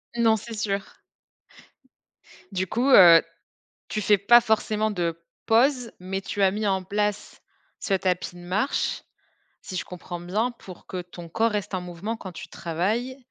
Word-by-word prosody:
Non, 230 Hz, -2 st, +4 dB
c'est 225 Hz, +2 st, -9 dB
sûr. 200 Hz, -2 st, -3 dB, 1.5 s
Du 190 Hz, -1 st, -2 dB
coup, 245 Hz, +8 st, 0 dB
heu, 170 Hz, -8 st, +9 dB, 0.7 s
tu 215 Hz, -, -2 dB
fais 205 Hz, 0 st, +4 dB
pas 235 Hz, +5 st, +7 dB
forcément 220 Hz, -1 st, 0 dB
de 170 Hz, -4 st, -3 dB, 0.2 s
pause, 245 Hz, +1 st, +3 dB
mais 190 Hz, +1 st, -4 dB
tu 200 Hz, +1 st, -3 dB
as 190 Hz, -, +5 dB
mis 210 Hz, +2 st, -2 dB
en 190 Hz, -1 st, +1 dB
place 205 Hz, +2 st, -2 dB, 0.4 s
ce 195 Hz, -, -1 dB
tapis 180 Hz, -1 st, -1 dB
de -, -, -11 dB
marche, 195 Hz, +10 st, -1 dB, 0.6 s
si 185 Hz, -, -8 dB
je 180 Hz, -, -2 dB
comprends 175 Hz, 0 st, -8 dB
bien, 205 Hz, +8 st, -1 dB
pour 190 Hz, -7 st, -13 dB
que 185 Hz, -, -4 dB
ton 175 Hz, -1 st, -11 dB
corps 225 Hz, +7 st, +1 dB
reste 205 Hz, -1 st, -3 dB
en 185 Hz, -, -1 dB
mouvement 180 Hz, +5 st, -5 dB
quand 190 Hz, -4 st, -8 dB
tu 170 Hz, -, -10 dB
travailles 215 Hz, +10 st, -2 dB
200 Hz, 160 wpm, -25 LUFS, 180-220 Hz, 1.5 s, heu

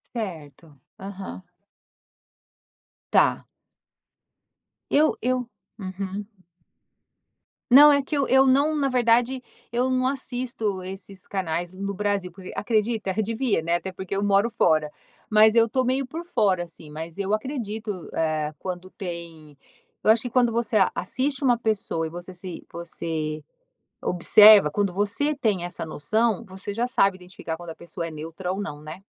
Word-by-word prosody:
Certo. 160 Hz, -, -7 dB, 0.2 s
Aham. 195 Hz, -1 st, -8 dB, 1.7 s
Tá. -, -, +3 dB, 1.5 s
Eu 305 Hz, +2 st, +4 dB
eu 250 Hz, 0 st, 0 dB, 0.3 s
uhum. 195 Hz, +1 st, -5 dB, 1.5 s
Não, 290 Hz, +4 st, +10 dB
é 280 Hz, -, +3 dB
que 290 Hz, +2 st, -3 dB
eu 275 Hz, -, +1 dB
eu 265 Hz, 0 st, +5 dB
não 285 Hz, +4 st, +3 dB
na 280 Hz, -2 st, +1 dB
verdade, 245 Hz, +1 st, +2 dB, 0.3 s
eu 250 Hz, +2 st, +1 dB
não 255 Hz, 0 st, +2 dB
assisto 245 Hz, -6 st, -3 dB
esses 190 Hz, 0 st, -9 dB
canais 175 Hz, -2 st, -2 dB
no 200 Hz, +1 st, -4 dB
Brasil, 200 Hz, -2 st, -1 dB
porque 185 Hz, +1 st, -10 dB
acredita? 215 Hz, -2 st, 0 dB
Eu 220 Hz, -, +1 dB
devia, 225 Hz, -3 st, 0 dB
né? 170 Hz, +1 st, 0 dB
Até 190 Hz, +2 st, -3 dB
porque 190 Hz, +1 st, -5 dB
eu 200 Hz, -, -1 dB
moro 200 Hz, +3 st, +3 dB
fora. 155 Hz, -9 st, +2 dB, 0.4 s
Mas 215 Hz, 0 st, +6 dB
eu 230 Hz, 0 st, +4 dB
tô 260 Hz, +3 st, +1 dB
meio 260 Hz, +1 st, 0 dB
por 330 Hz, +6 st, -6 dB
fora, 205 Hz, -, +1 dB
assim, 165 Hz, -2 st, -11 dB
mas 160 Hz, +4 st, -7 dB
eu 200 Hz, 0 st, -2 dB
acredito, 215 Hz, -, -5 dB
eh, 155 Hz, -2 st, 0 dB
quando 185 Hz, 0 st, -6 dB
tem 170 Hz, -5 st, -8 dB, 0.5 s
eu -, -, +2 dB
acho 220 Hz, +2 st, +5 dB
que 245 Hz, -, -3 dB
quando 245 Hz, -1 st, +3 dB
você 230 Hz, -1 st, 0 dB
a 190 Hz, -, +4 dB
assiste 265 Hz, +9 st, -2 dB
uma 245 Hz, -3 st, +3 dB
pessoa 205 Hz, -7 st, -1 dB
e -, -, -7 dB
você 175 Hz, +3 st, -8 dB
se 180 Hz, -1 st, -8 dB
você 160 Hz, -2 st, -4 dB, 0.6 s
observa 205 Hz, 0 st, +7 dB
quando 200 Hz, +2 st, 0 dB
você 205 Hz, +10 st, 0 dB
tem 215 Hz, -10 st, 0 dB
essa 175 Hz, -2 st, -5 dB
noção, 215 Hz, +8 st, 0 dB
você 195 Hz, +1 st, -7 dB
já 240 Hz, +2 st, 0 dB
sabe 195 Hz, -6 st, +2 dB
identificar 180 Hz, -3 st, -7 dB
quando 175 Hz, 0 st, -9 dB
a 160 Hz, -, -7 dB
pessoa 170 Hz, 0 st, -6 dB
é 165 Hz, -, -6 dB
neutra 165 Hz, +4 st, -5 dB
ou 195 Hz, -, -4 dB
não, 150 Hz, -7 st, -6 dB
né? 155 Hz, +5 st, -9 dB
200 Hz, 155 wpm, -25 LUFS, 175-235 Hz, 1.7 s, Não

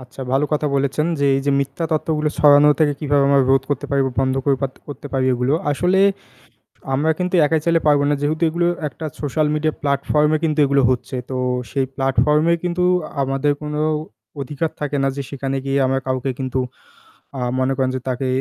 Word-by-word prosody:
আচ্ছা, 130 Hz, +1 st, -12 dB
ভালো 135 Hz, +2 st, +2 dB
কথা 150 Hz, 0 st, 0 dB
বলেছেন 140 Hz, +3 st, 0 dB
যে, -, -, +2 dB
এই -, -, -1 dB
যে -, -, +3 dB
মিথ্যা 140 Hz, +4 st, -3 dB
তথ্যগুলো 155 Hz, -1 st, 0 dB
ছড়ানো 145 Hz, 0 st, +6 dB
থেকে 145 Hz, -2 st, +3 dB
কিভাবে 145 Hz, -1 st, +2 dB
আমরা 140 Hz, -1 st, +4 dB
রোধ 135 Hz, 0 st, +4 dB
করতে 145 Hz, -, -2 dB
পারি 140 Hz, 0 st, +2 dB
বা 130 Hz, -, -3 dB
বন্ধ 130 Hz, 0 st, +1 dB
করে 140 Hz, -2 st, +2 dB
পাত্তে 135 Hz, -1 st, -4 dB
করতে 145 Hz, 0 st, -8 dB
পারি 130 Hz, -1 st, +1 dB
এগুলো। 125 Hz, +4 st, 0 dB, 0.2 s
আসলে 180 Hz, +6 st, +2 dB, 0.9 s
আমরা 150 Hz, +4 st, +1 dB
কিন্তু 180 Hz, +1 st, -2 dB
একাই 160 Hz, +1 st, +1 dB
চালে 165 Hz, -1 st, +3 dB
পারব 145 Hz, -1 st, +4 dB
না। -, -, +3 dB
যেহেতু 155 Hz, +3 st, -1 dB
এগুলো 170 Hz, +1 st, 0 dB, 0.2 s
একটা 160 Hz, +3 st, -10 dB, 0.2 s
social 150 Hz, +1 st, 0 dB
media 155 Hz, 0 st, 0 dB
platform-এ 150 Hz, +2 st, +1 dB
কিন্তু 155 Hz, -1 st, 0 dB
এগুলো 140 Hz, 0 st, +2 dB
হচ্ছে। 130 Hz, +1 st, -2 dB
তো 130 Hz, -, -3 dB, 0.3 s
সেই 135 Hz, -1 st, 0 dB
platform-এ 150 Hz, +5 st, +2 dB
কিন্তু 180 Hz, 0 st, -1 dB, 0.4 s
আমাদের 135 Hz, +2 st, 0 dB
কোনো 150 Hz, 0 st, -3 dB, 0.6 s
অধিকার 145 Hz, +4 st, -3 dB
থাকে 145 Hz, -1 st, -2 dB
না 135 Hz, -, +2 dB
যে 140 Hz, -, -3 dB
সেখানে 135 Hz, -1 st, -3 dB
গিয়ে 135 Hz, 0 st, 0 dB
আমরা 135 Hz, +1 st, +1 dB
কাউকে 130 Hz, +1 st, -1 dB
কিন্তু 130 Hz, -1 st, -2 dB, 0.8 s
আ -, -, -4 dB, 0.2 s
মনে 130 Hz, +1 st, +1 dB
করেন 130 Hz, -1 st, +1 dB
যে -, -, -2 dB
তাকে 130 Hz, +1 st, -2 dB
145 Hz, 190 wpm, -20 LUFS, 135-150 Hz, 0.9 s, ছড়ানো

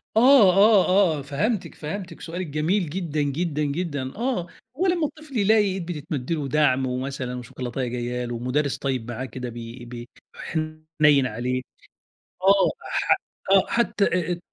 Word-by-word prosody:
آه 235 Hz, -5 st, +7 dB
آه 200 Hz, 0 st, +6 dB, 0.3 s
آه، -, -, -5 dB
فهمتِك، 165 Hz, -, -2 dB
فهمتِك، 170 Hz, +2 st, -6 dB
سؤالِك 175 Hz, +2 st, -5 dB
جميل 160 Hz, +5 st, 0 dB
جدًا 160 Hz, -3 st, -2 dB
جدًا 150 Hz, +2 st, -1 dB
جدًا. 145 Hz, -3 st, -3 dB
آه، 235 Hz, -6 st, -1 dB, 0.3 s
هو 370 Hz, +4 st, +2 dB
لمّا 350 Hz, -3 st, +2 dB
الطفل 305 Hz, -3 st, -9 dB
يلاقي 215 Hz, +1 st, +4 dB
إيد 190 Hz, -3 st, -2 dB
بتتمَد 155 Hz, -4 st, -4 dB
له 165 Hz, -, +1 dB
ودَعم 140 Hz, -2 st, +2 dB
ومثلًا 130 Hz, 0 st, -3 dB
وشوكولاتاية 125 Hz, +1 st, -4 dB
جايّة 125 Hz, 0 st, -3 dB
له، 120 Hz, -1 st, -4 dB
مدرّس 135 Hz, +4 st, 0 dB
طيّب 130 Hz, -4 st, -3 dB
معاه 125 Hz, +3 st, -4 dB
كده 125 Hz, 0 st, -6 dB
بي 120 Hz, +1 st, -8 dB
ب 120 Hz, 0 st, -8 dB, 0.3 s
حنيّن 155 Hz, -3 st, +1 dB
عليه، 125 Hz, +3 st, -2 dB, 0.8 s
آه، 195 Hz, +1 st, +5 dB, 0.2 s
ح -, -, +3 dB, 0.4 s
آه 195 Hz, -1 st, +6 dB
حتّى 210 Hz, -3 st, +1 dB
أ -, -, +3 dB
أ 185 Hz, -, +1 dB
التق 175 Hz, -, -2 dB
150 Hz, 155 wpm, -24 LUFS, 130-190 Hz, 0.8 s, آه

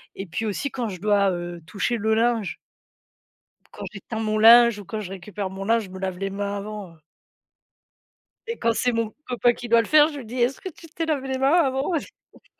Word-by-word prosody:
et 195 Hz, -, -6 dB
puis 220 Hz, +7 st, -3 dB
aussi 240 Hz, +7 st, -2 dB
quand 245 Hz, -3 st, -3 dB
je 185 Hz, -3 st, -7 dB
dois, 200 Hz, -2 st, +3 dB
heu, 175 Hz, -1 st, -5 dB
toucher 215 Hz, +5 st, -1 dB
le 220 Hz, 0 st, +1 dB
linge. 230 Hz, -3 st, 0 dB, 1.2 s
Quand -, -, -8 dB
j'étend 220 Hz, +3 st, -6 dB
mon 215 Hz, -1 st, -1 dB
linge 235 Hz, 0 st, +7 dB
ou 205 Hz, -, -9 dB
quand 215 Hz, +4 st, -5 dB
je 200 Hz, -, -6 dB
récupère 195 Hz, +1 st, -5 dB
mon 195 Hz, +1 st, -6 dB
linge, 225 Hz, 0 st, +2 dB
je -, -, -11 dB
me 190 Hz, -, -8 dB
lave 190 Hz, -1 st, -4 dB
les 195 Hz, 0 st, -2 dB
mains 200 Hz, +1 st, -3 dB
avant, 205 Hz, -3 st, -7 dB
heu 155 Hz, -, -25 dB, 1.5 s
et 460 Hz, 0 st, -4 dB
quand 230 Hz, -, +2 dB
c'est 245 Hz, +1 st, +1 dB
mon 230 Hz, -1 st, -1 dB, 0.2 s
copain 245 Hz, -1 st, +3 dB
qui 240 Hz, 0 st, -8 dB
doit 230 Hz, 0 st, +5 dB
le 225 Hz, -, -2 dB
faire, 305 Hz, 0 st, +6 dB
je 295 Hz, -3 st, -7 dB
lui 245 Hz, -, -9 dB
dis: 245 Hz, +2 st, -5 dB
«Est-ce 255 Hz, +2 st, 0 dB
que 375 Hz, -, -6 dB
tu 335 Hz, 0 st, -14 dB
t'es 330 Hz, +1 st, -4 dB
lavé 275 Hz, -4 st, -1 dB
les 260 Hz, 0 st, -2 dB
mains 270 Hz, +3 st, +3 dB
avant? 275 Hz, -3 st, +2 dB, 0.7 s
Parc -, -, -52 dB
220 Hz, 230 wpm, -24 LUFS, 195-250 Hz, 1.5 s, linge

